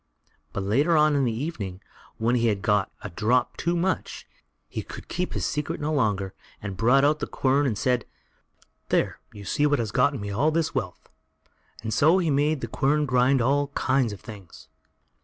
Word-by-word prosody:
But 100 - -3
later 140 - +2
on 150 -1 +4
in 140 -2 +2
the 120 - +1
evening, 110 - -4 0.4
when 115 +2 +1
he 120 -1 +2
had 100 -3 0
got 105 -3 +2
a 105 - -6
drop 115 +8 +1
too 170 +1 -1
much, 185 +2 -2 0.4
he - - -4
could - - -10
keep 180 0 -3
his - - -2
secret 150 -1 -2
no 150 +1 -1
longer, 100 -8 0 0.3
and 100 -2 -6
brought 125 +7 +4
out 150 +1 +2
the - - -3
quern 140 +2 +1
and 110 -5 -1
said: 125 0 +1 0.8
"There, - - +1
you 100 -1 -11
see 145 +10 +2
what 145 0 +2
has 115 -3 -2
gotten 135 +1 +2
me 100 0 -5
all 140 +10 +2
this 160 0 0
wealth;" 90 -1 -4 0.8
and 110 -1 -2
so 160 +5 +5
he 170 -5 +1
made 145 +1 +1
the - - -3
quern 150 +2 +1
grind 130 -1 +3
all 140 +3 +2
kind 130 -3 +1
of 100 - -8
things. 100 -6 -12
130 Hz, 195 wpm, -25 LUFS, 105-150 Hz, 0.8 s, so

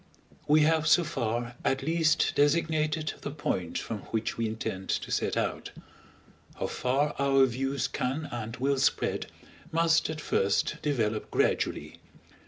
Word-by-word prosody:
We 155 +1 +5
have 160 0 +3
so 175 - +5
far 120 -6 -2
at 135 0 0
least 160 0 +2
designated 155 +1 +1
the - - -4
point 95 - -2
from 110 - -4
which 110 0 -2
we 115 -1 -1
intend 105 -3 -5
to - - -1
set - - 0
out; - - -2 0.9
how - - -3
far 140 +4 0
our 135 -1 +5
views 135 +1 -1
can 140 +3 -2
and 115 -1 -5
will 135 +1 +1
spread, - - +1 0.4
must 165 0 +3
at 155 -1 -4
first 100 -9 +1
develop 110 -7 -1
gradually. - - 0
140 Hz, 140 wpm, -28 LUFS, 120-155 Hz, 0.9 s, We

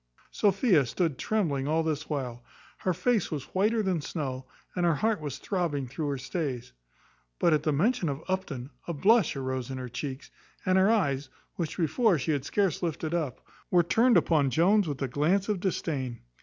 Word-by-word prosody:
Sophia 195 - +3
stood 150 +2 -1
trembling 155 -11 0
all 160 +2 +2
this 155 -1 -2
while. 125 -5 -3 0.4
Her 185 - 0
face 190 +4 +1
was 145 -4 -6
whiter 215 +4 +2
than 185 -5 0
snow, 135 -5 -4 0.3
and 180 - 0
her 170 -2 +3
heart 215 +3 0
was 145 -3 -4
throbbing 160 -9 -2
through 145 +4 -4
her 140 - -1
stays. 130 - -4 0.6
But, 165 - +3
at 150 - +3
the 155 - +1
mention 180 - +1
of 140 +3 -4
Upton, 155 -9 -3 0.2
a 170 - -2
blush 205 +3 +4
arose 130 -2 -3
in 130 - -4
her 125 -1 -5
cheeks, 130 +2 -6 0.3
and 185 0 +4
her 190 +2 +5
eyes, 145 -11 +1 0.2
which 170 -4 -4
before 185 - +3
she 150 +3 -1
had 145 -2 -1
scarce 195 -1 0
lifted 160 -1 -2
up, 155 -8 -2 0.3
were 175 -1 +4
turned 230 +6 +4
upon 155 -4 +3
Jones 185 - +3
with 145 -2 -3
a - - 0
glance 160 +10 +1
of 210 -3 0
disdain. 145 -9 -2
160 Hz, 185 wpm, -28 LUFS, 135-190 Hz, 0.6 s, her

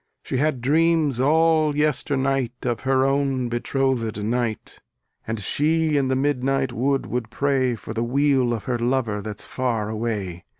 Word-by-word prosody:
She - - -3
had 145 -2 0
dreams 155 -1 +2
all 155 +1 +3
yesternight 135 -4 0
Of 120 -2 0
her 130 0 +2
own 135 -2 0
betrothed 120 -3 -1
knight; 115 0 -3 0.5
And 110 0 -2
she 155 - +1
in 140 -2 +2
the 130 - +1
midnight 135 -1 0
wood 135 +3 0
will 125 - -2
pray 135 -3 +1
For 110 - -8
the 115 +1 -1
weal 135 0 +2
of 115 -3 -3
her 120 -2 -2
lover 120 -4 0
that's 105 +1 -5
far 115 -5 -2
away. 105 -6 -4
130 Hz, 155 wpm, -23 LUFS, 120-140 Hz, 0.5 s, all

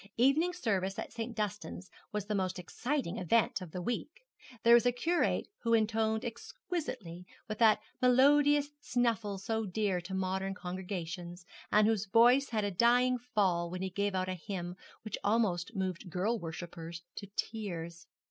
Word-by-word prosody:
Evening 275 +9 +4
service 200 - -1
at - - -5
St. 230 0 -4
Dunstan's 210 -3 -4 0.2
was 210 -2 -2
the 210 - -2
most 185 -2 -1
exciting 230 - -2
event 200 +3 +2
of 180 - -7
the 180 +2 -5
week. 305 - -4 0.4
There 235 - +7
was 240 +1 +6
a - - +5
curate 330 +8 +1
who 230 -1 +2
intoned 220 +1 +1
exquisitely, 240 - -5 0.2
with 215 -1 -5
that 220 -2 +5 0.2
melodious 285 +3 +5
snuffle 230 -7 0
so 220 +3 -2
dear 195 -2 0
to 190 +2 -6
modern 190 +1 -1
congregations, 180 -1 -5 0.3
and 210 0 +5
whose 220 -1 +1
voice 240 +6 +5
had 220 -3 0
a 205 - 0
dying 245 +5 +4
fall 195 -8 +1
when 185 +2 -4
he 190 - -3
gave 200 +1 -1
out 185 0 0
a 185 - -1
hymn 180 0 -5 0.3
which 215 -2 -4
almost 200 -5 +1
moved 185 -1 -3
girl 205 +7 0
worshippers 170 0 -7
to 200 - -6
tears. 175 -6 -4
210 Hz, 160 wpm, -32 LUFS, 185-235 Hz, 0.4 s, There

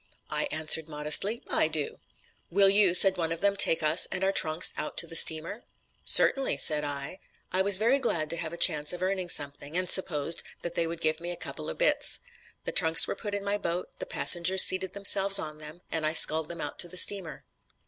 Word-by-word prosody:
"I - - -3
answered 155 0 -1
modestly, 155 +10 0
'I - - -1
do.' 460 +1 -6 0.5
"'Will 195 +2 +3
you,' 195 -3 +5
said 190 0 +5
one 165 -2 -4
of 165 - -5
them, 200 0 -1
'take 165 -4 +2
us 155 +3 +3
and 185 - -5
our 195 - 0
trunks 155 -3 +4
out 150 - -8
to - - +1
the 165 0 -7
steamer?' 165 +8 +4 0.4
"'Certainly,' 270 -1 +2
said 150 -1 +2
I. 145 +5 -6 0.3
I 185 - 0
was 195 0 +3
very 235 +7 0
glad 170 - -4
to 170 - -6
have 160 -2 -7
a 170 - -10
chance 150 -4 +1
of 180 +1 -8
earning 185 -1 -5
something, 145 +1 -3
and 185 0 -3
supposed 165 -4 +1 0.2
that 170 - -6
they 165 - -3
would 165 0 -9
give 155 -1 -2
me 170 +1 -8
a 175 - -6
couple - - -9
of - - -9
'bits.' - - -1 0.5
The - - -5
trunks 165 -3 +3
were - - -5
put 205 -2 -8
in 200 - -7
my 200 +1 -4
boat, 175 -1 -6
the - - -8
passengers 185 - +3
seated 185 0 -1
themselves 200 0 +2
on 155 -3 -7
them, 155 +3 -12
and 160 - -5
I 155 0 -3
sculled 160 -1 +2
them 170 -1 -9
out 145 - -8
to - - +2
the 180 - -6
steamer. 190 -4 +2
175 Hz, 220 wpm, -25 LUFS, 155-195 Hz, 0.5 s, you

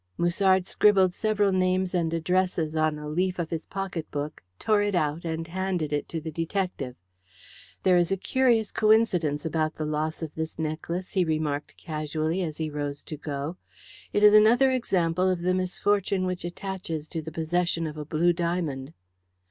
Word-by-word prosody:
Musard 185 +2 +3
scribbled 190 -2 +4
several 210 -1 +1
names 185 0 +1
and 170 -3 +1
addresses 165 -1 0
on 155 -1 +1
a 150 0 -7
leaf 180 +4 0
of 170 -2 -3
his 165 -1 -4
pocket 190 -4 -4
book, 145 +1 -4 0.2
tore 215 - +2
it 205 -1 0
out, 155 0 0
and 165 0 -2
handed 180 -3 -2
it 145 - -2
to 165 - -3
the 160 0 -6
detective. 165 -5 -3 0.9
"There 185 -1 +5
is 175 +1 +2
a 195 - +2
curious 235 -1 +2
coincidence 185 -9 +2
about 155 -1 0
the 155 - -3
loss 155 +2 -2
of 155 -2 -5
this, 160 0 -4
necklace," 165 +3 -3
he 185 - +2
remarked 155 -3 -2
casually, 155 +2 -2
as 155 -4 -3
he 160 - -2
rose 145 -1 -4
to 155 - -6
go. 145 +3 -5 0.5
"It 205 - +1
is 210 0 +8
another 235 +5 +6
example 185 -7 +1
of 180 -2 -1
the 185 +1 +2
misfortune 185 +1 0
which 180 -1 -3
attaches 175 -4 -5
to 165 - -3
the 160 +1 -7
possession 165 +1 0
of 155 -1 -5
a 150 - -5
blue 160 +4 +2
diamond." 165 -5 -2
170 Hz, 175 wpm, -27 LUFS, 155-190 Hz, 0.9 s, is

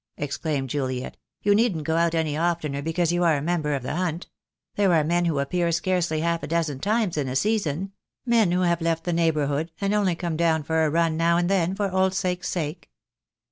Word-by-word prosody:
exclaimed 145 -1 -2
Juliet. 130 -2 -3 0.3
"You 205 - +4
needn't 205 -7 +1
go 160 +1 -1
out 170 0 +2
any 160 -2 0
oftener 155 -4 -1
because 165 +2 0
you 175 0 +1
are 165 -3 +3
a - - -3
member 155 -3 0
of 135 - -4
the 130 - -3
Hunt. 175 -1 -2 0.4
There 200 -2 +2
are 155 - +3
men 175 +3 +1
who 165 -4 0
appear 170 +5 0
scarcely 170 -2 0
half 170 0 0
a - - -5
dozen 155 -4 -1
times 210 -1 0
in 140 - -1
a 130 - -3
season 195 -1 0 0.2
— - - -59
men 215 -6 +4
who 180 +1 +1
have 170 -1 +1
left 165 0 0
the 175 - -1
neigh 165 -1 +3
bourhood, 150 +1 -1
and 200 0 0
only 200 -4 +2
come 170 -2 -3
down 160 -2 +2
for 160 +2 +1
a 155 - +2
run 165 0 +1
now 170 +1 +3
and 175 0 +1
then 185 -1 +1
for 200 -1 -1
old 190 0 +1
sake's 180 -1 -1
sake." 165 -1 -4
170 Hz, 225 wpm, -24 LUFS, 155-180 Hz, 0.4 s, You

